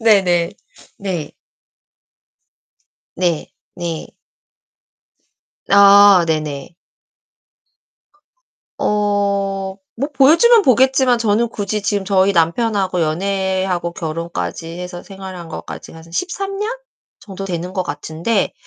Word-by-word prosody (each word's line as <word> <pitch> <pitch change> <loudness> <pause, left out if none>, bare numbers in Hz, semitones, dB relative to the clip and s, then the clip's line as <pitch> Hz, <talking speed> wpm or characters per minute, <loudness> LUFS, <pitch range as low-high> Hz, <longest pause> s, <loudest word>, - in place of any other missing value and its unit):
네네. 185 -6 +3 0.5
네. 180 -7 -4 1.8
네, 175 -4 0 0.3
네. 170 -3 -4 1.6
아 200 -2 +7
네네. 155 0 -3 2.0
어 200 -2 0 0.2
뭐 275 +5 -2
보여주면 340 - +6
보겠지만 260 -1 +3
저는 225 +1 +1
굳이 205 0 -3
지금 205 -1 -1
저희 195 0 +3
남편하고 190 +1 +1
연애하고 190 +1 -1
결혼까지 165 - -4
해서 180 0 -7
생활한 190 -3 -9
것까지가 165 0 -9
한 165 +1 -15
13 390 - -3
년 425 +2 -2 0.5
정도 195 -1 -8
되는 180 -1 -4
것 185 - 0
같은데 160 +7 -2
195 Hz, 185 characters per minute, -18 LUFS, 170-210 Hz, 2.0 s, 아